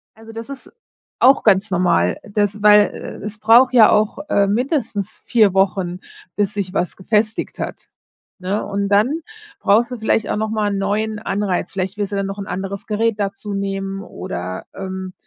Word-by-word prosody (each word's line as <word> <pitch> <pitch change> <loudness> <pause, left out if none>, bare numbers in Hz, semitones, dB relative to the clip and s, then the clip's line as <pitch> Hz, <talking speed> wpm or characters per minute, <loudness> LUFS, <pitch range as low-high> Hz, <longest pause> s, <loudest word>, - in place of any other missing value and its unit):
Also, 225 0 -13
das 225 +3 -8
ist 275 -1 -9 0.5
auch 265 +2 +5
ganz 200 0 +3
normal. 175 - +2
Das 205 0 -2
weil, 210 0 +8
äh, - - -8
es 210 0 -6
braucht 235 +5 +5
ja 235 -4 +7
auch, 210 0 +2
äh, 200 -8 +3
mindestens 220 - -1
4 215 -6 +3
Wochen, 190 -2 +1 0.4
bis 205 0 0
sich 195 -3 -3
was 180 - -1
gefestigt 215 +3 -1
hat, - - -6 0.5
ne? 190 +3 -2
Und, 200 0 -2
dann 220 +11 +2 0.4
brauchst 225 +5 +3
du 250 - -5
vielleicht 220 -1 0
auch - - -1
noch 215 0 -1
mal 215 -1 0
‘n 200 - -2
neuen 210 +2 -1
Anreiz. 200 -4 -2
Vielleicht 190 +1 -3
willst 205 -1 -2
du - - -1
dann 195 0 -1
noch 195 +1 -6
‘n 200 - -5
anderes 195 +2 -5
Gerät 220 0 0
dazu 200 0 -4
nehmen, 195 0 -3
oder, 90 - -6
ähm, 190 -1 -6
205 Hz, 180 wpm, -19 LUFS, 195-220 Hz, 0.5 s, weil